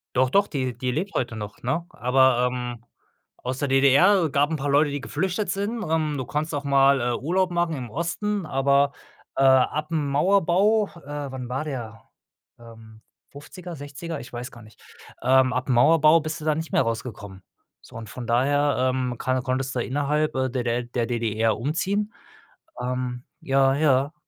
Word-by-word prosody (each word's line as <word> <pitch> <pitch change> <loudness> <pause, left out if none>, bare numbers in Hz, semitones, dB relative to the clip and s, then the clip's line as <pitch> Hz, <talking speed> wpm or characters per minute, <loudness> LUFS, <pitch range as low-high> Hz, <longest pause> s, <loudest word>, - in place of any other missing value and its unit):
Doch, 130 0 +3
doch, 200 +7 +3
die 130 -4 -3
die 125 -1 -2
lebt 185 +9 -3
heute 120 -3 -2
noch, 105 -1 -8
ne? 150 +8 -2
Aber, 125 +1 +3
ähm, 120 -2 -6 0.5
aus 125 +1 -5
der 145 - -1
DDR 145 +7 +4
gab 145 +1 +2
'n 160 - -1
paar 145 0 -3
Leute, 145 +2 +4
die 145 0 -4
geflüchtet 190 +7 -2
sind. 205 +4 -2
Ähm, 155 -3 -1
du 130 - -3
kannst 150 +4 -3
auch 145 - -3
mal, 140 -1 +4
äh, 120 0 0
Urlaub 180 +7 0
machen 175 -2 0
im 125 -4 -6
Osten, 185 - -2
aber, 140 0 +2 0.4
äh, 135 - +2
ab 135 +4 +3
'm 150 -3 0
Mauerbau 195 +6 +3
äh, 145 -3 -7
wann 125 -2 -6
war 135 +4 -3
der? 115 -6 -6 0.6
Ähm, 110 -1 -14 0.3
50er, 170 +5 -10
60er, 145 +3 -7
ich 120 - -12
weiß 120 +1 -6
gar 120 - -13
nicht. 110 0 -18 0.4
Ähm, 130 0 +4
ab 130 +2 -2
'm - - +3
Mauerbau 155 +5 +5
bist 155 +2 -5
du - - -7
da 155 -1 +2
nicht 160 +1 -5
mehr - - +3
rausgekommen. 110 -5 -5 0.4
So - - -12
und 110 -3 -8
von 125 +1 -7
daher, 130 +2 +2
ähm, 125 -2 -2
kann 130 0 -1
konntest 130 0 -2
du 125 - 0
innerhalb, 150 +4 0
äh, 130 0 0
der 125 0 -2
der 120 0 -1
der 120 -1 -3
DDR 115 -2 0
umziehen. 190 - -1 0.7
Ähm, 125 -1 -3 0.2
ja, 135 0 +2
ja. 140 -1 +2
135 Hz, 185 wpm, -24 LUFS, 125-155 Hz, 0.7 s, Mauerbau